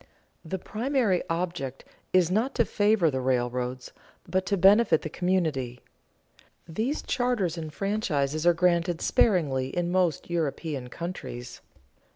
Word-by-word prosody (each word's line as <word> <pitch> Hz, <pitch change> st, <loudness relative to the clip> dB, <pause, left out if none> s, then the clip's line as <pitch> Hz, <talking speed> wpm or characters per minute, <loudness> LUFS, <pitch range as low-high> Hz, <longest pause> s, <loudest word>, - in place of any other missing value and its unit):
The 180 Hz, +4 st, -4 dB
primary 225 Hz, -1 st, 0 dB
object 165 Hz, -6 st, -3 dB, 0.3 s
is 180 Hz, -2 st, +3 dB
not 225 Hz, +8 st, 0 dB
to 235 Hz, -, +3 dB
favor 205 Hz, -7 st, +2 dB
the 130 Hz, -1 st, -2 dB
railroads, 125 Hz, 0 st, -1 dB, 0.4 s
but 185 Hz, 0 st, -1 dB
to 200 Hz, -, +1 dB
benefit 195 Hz, -2 st, +5 dB
the 155 Hz, -, -5 dB
community. 160 Hz, -10 st, -1 dB, 0.9 s
These 220 Hz, -, -2 dB
charters 240 Hz, -9 st, 0 dB
and 160 Hz, -2 st, -6 dB
franchises 155 Hz, -6 st, -1 dB
are 175 Hz, -, +7 dB
granted 170 Hz, -1 st, +2 dB
sparingly 145 Hz, -, +2 dB
in 175 Hz, +5 st, -2 dB
most 180 Hz, -4 st, +1 dB
European 155 Hz, -5 st, -2 dB
countries. 125 Hz, -5 st, -7 dB
175 Hz, 125 wpm, -27 LUFS, 140-195 Hz, 0.9 s, are